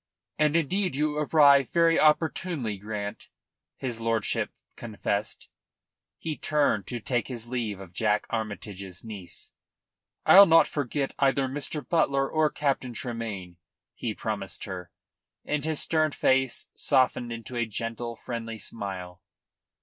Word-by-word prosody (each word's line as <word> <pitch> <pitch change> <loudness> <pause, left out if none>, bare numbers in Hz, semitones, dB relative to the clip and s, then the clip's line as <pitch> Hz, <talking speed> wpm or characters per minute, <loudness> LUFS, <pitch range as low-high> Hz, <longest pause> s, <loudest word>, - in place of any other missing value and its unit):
"And 150 0 +3
indeed 180 +1 +1
you 150 +1 0
arrive 145 -3 +5
very 165 -1 +4
opportunely, 155 - +1
Grant," 105 0 -5 0.5
his 120 -3 -3
lordship 115 -2 0 0.3
confessed. 105 -2 -3 0.7
He 160 -2 -4
turned 145 -12 +1
to 120 - -3
take 120 +2 -1
his 120 -3 -6
leave 115 -6 -2
of 95 -2 -11
Jack 105 +1 +1
Armytage's 100 -4 -5
niece. 100 -6 -8 0.7
"I'll 200 +1 +10
not 165 0 +7
forget 140 -1 -2
either 135 -1 +3
Mr. 145 +1 -3
Butler 140 -5 +2
or 155 0 +2
Captain 135 -5 -1
Tremayne," 105 -8 -5 0.4
he 110 -3 -4
promised 100 -5 -2
her, 90 -3 -6 0.6
and 150 -1 -1
his 155 -1 0
stern 155 -1 +2
face 130 -1 +1
softened 130 -3 +2
into 115 +2 -7
a 120 -1 0
gentle, 115 +2 -4
friendly 115 -1 -5
smile. 95 -4 -6
120 Hz, 125 wpm, -27 LUFS, 105-145 Hz, 0.7 s, I'll